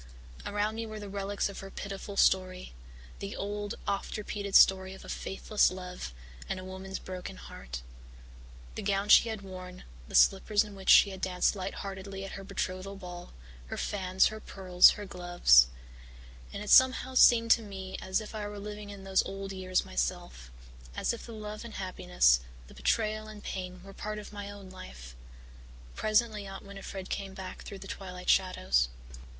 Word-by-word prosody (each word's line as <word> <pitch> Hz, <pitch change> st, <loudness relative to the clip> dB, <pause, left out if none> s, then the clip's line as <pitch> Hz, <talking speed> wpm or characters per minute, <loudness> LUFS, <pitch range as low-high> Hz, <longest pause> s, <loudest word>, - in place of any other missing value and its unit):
Around 210 Hz, +1 st, 0 dB
me 225 Hz, 0 st, -3 dB
were 215 Hz, 0 st, -7 dB
the 205 Hz, -, -7 dB
relics 200 Hz, 0 st, -1 dB
of 200 Hz, -, -7 dB
her 195 Hz, -, -8 dB
pitiful 200 Hz, 0 st, -7 dB
story 185 Hz, -, +2 dB, 0.5 s
the 200 Hz, 0 st, -5 dB
old, 205 Hz, +1 st, -3 dB
oft 200 Hz, +2 st, -2 dB
repeated 205 Hz, -1 st, -4 dB
story 190 Hz, 0 st, +6 dB
of -, -, -13 dB
a -, -, -10 dB
faithless 205 Hz, +2 st, +1 dB
love 180 Hz, -, -7 dB, 0.4 s
and 185 Hz, -, -2 dB
a -, -, -8 dB
woman's 190 Hz, +1 st, -6 dB
broken 185 Hz, -, -7 dB
heart -, -, -8 dB, 0.9 s
the -, -, -5 dB
gown 200 Hz, 0 st, 0 dB
she 230 Hz, -, +8 dB
had 220 Hz, -2 st, -5 dB
worn, 185 Hz, -1 st, -9 dB, 0.2 s
the -, -, -7 dB
slippers 205 Hz, +2 st, +5 dB
in 210 Hz, -1 st, -10 dB
which 195 Hz, -1 st, -5 dB
she 200 Hz, -, +8 dB
had 190 Hz, -1 st, -8 dB
danced 185 Hz, +2 st, +1 dB
light 190 Hz, 0 st, -4 dB
heartedly 195 Hz, 0 st, -6 dB
at 195 Hz, -, -7 dB
her 195 Hz, -, -7 dB
betrothal 195 Hz, 0 st, -4 dB
ball, 180 Hz, -2 st, -9 dB, 0.4 s
her -, -, -5 dB
fan, 185 Hz, -2 st, -3 dB
her 215 Hz, -, -7 dB
pearls, 185 Hz, -4 st, +5 dB
her 205 Hz, -, -6 dB
gloves 175 Hz, -, +5 dB, 0.8 s
and 200 Hz, -, -5 dB
it 210 Hz, -, -2 dB
somehow 260 Hz, 0 st, +6 dB
seemed 230 Hz, -2 st, +6 dB
to 230 Hz, -, +6 dB
me 190 Hz, -3 st, -7 dB
as 190 Hz, +3 st, 0 dB
if 215 Hz, 0 st, -8 dB
I 210 Hz, -1 st, -4 dB
were 205 Hz, 0 st, -7 dB
living 210 Hz, 0 st, -7 dB
in 200 Hz, -1 st, -9 dB
those 190 Hz, 0 st, +2 dB
old 195 Hz, 0 st, -6 dB
years 185 Hz, -1 st, 0 dB
myself, -, -, -3 dB, 0.5 s
as -, -, 0 dB
if 235 Hz, -, -8 dB
the -, -, -8 dB
love 215 Hz, 0 st, -7 dB
and 235 Hz, -1 st, -9 dB
happiness, 180 Hz, -, +3 dB, 0.3 s
the -, -, -15 dB
betrayal 215 Hz, -1 st, 0 dB
and 215 Hz, -1 st, -10 dB
pain 185 Hz, -1 st, -5 dB
were 195 Hz, 0 st, -11 dB
part 215 Hz, +2 st, -5 dB
of 210 Hz, 0 st, -9 dB
my 205 Hz, -1 st, -6 dB
own 200 Hz, -2 st, -10 dB
life. -, -, -10 dB, 0.8 s
Presently 215 Hz, -1 st, +1 dB
Aunt 195 Hz, +1 st, -8 dB
Winnifred 195 Hz, -1 st, -8 dB
came 195 Hz, -1 st, -4 dB
back 185 Hz, -1 st, -7 dB
through 200 Hz, -, -8 dB
the -, -, -10 dB
twilight 180 Hz, -2 st, -6 dB
shadows. 65 Hz, -, +2 dB
195 Hz, 180 wpm, -30 LUFS, 185-205 Hz, 0.9 s, she